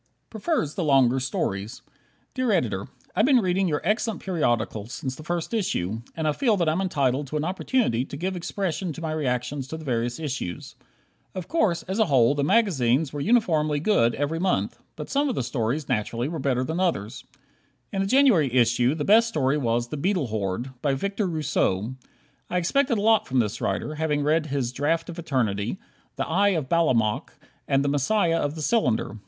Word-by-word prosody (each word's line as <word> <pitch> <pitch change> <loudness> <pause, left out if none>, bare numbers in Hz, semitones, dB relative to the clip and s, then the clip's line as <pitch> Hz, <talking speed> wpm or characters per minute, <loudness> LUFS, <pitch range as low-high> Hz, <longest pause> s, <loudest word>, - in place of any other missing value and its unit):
Prefers 220 - -1
the 180 - -2
Longer 135 -4 +4
Stories 110 -3 -3 0.5
Dear 255 -3 0
Editor: 105 - 0 0.3
I've 215 +6 +3
been 275 -2 +6
reading 190 -3 +1
your 150 -3 -1
excellent 215 +2 0
periodical 120 - -1
since 130 +2 -5
the - - -10
first 175 +4 -3
issue, 115 - -1 0.2
and 160 -1 -1
I - - +3
feel 220 - +1
that 170 -3 +1
I'm 160 +4 +1
entitled 140 -6 0
to 150 - -3
an 150 - -1
opportunity 185 - 0
to 140 - -8
give 185 +4 -2
expression 180 -1 -3
to 165 - -9
my 160 -1 -3
reactions 135 -2 -2
to 160 - -6
the 160 - -10
various 120 -1 -1
issues. 130 - -5 0.6
Of 185 -2 -5
course, 215 - +1
as 190 +4 -3
a 220 - +5
whole, 130 -4 +4
the 145 -1 -1
magazines 150 - +2
were 145 - -3
uniformly 155 -8 +2
good 145 - +2
every 145 +3 -1
month, 185 +1 0 0.2
but - - -7
some 285 +1 +2
of 250 - -2
the - - -1
stories, 125 +4 -2
naturally, 120 0 -1
were 160 +1 -4
better 130 -2 0
than 160 +6 -3
others. 130 - -1 0.7
In 195 - 0
the 195 - 0
January 215 - +4
issue 120 +2 +3
the 150 -2 -3
best 225 +3 +5
story 150 -8 +1
was 120 -2 0
"The 150 - -4
Beetle 175 - 0
Horde" 105 +4 -3
by 140 -2 +1
Victor 200 +7 -2
Rousseau. 130 - 0 0.6
I 180 - -1
expected 245 - +1
a - - -1
lot 220 0 +3
from 130 - -1
this 110 -2 0
writer, 150 - -2
having 150 -1 -1
read 155 +1 +1
his 135 -4 -1
"Draft 160 +6 -1
of 170 - -9
Eternity," 120 - -1 0.4
"The - - -2
Eye 200 +3 +3
of 140 -4 -4
Balamok" 125 -11 +1 0.3
and 135 +1 +2
"The - - +2
Messiah 165 +4 +2
of 145 +1 -2
the 155 - -5
Cylinder." 125 - 0
150 Hz, 195 wpm, -25 LUFS, 125-185 Hz, 0.7 s, been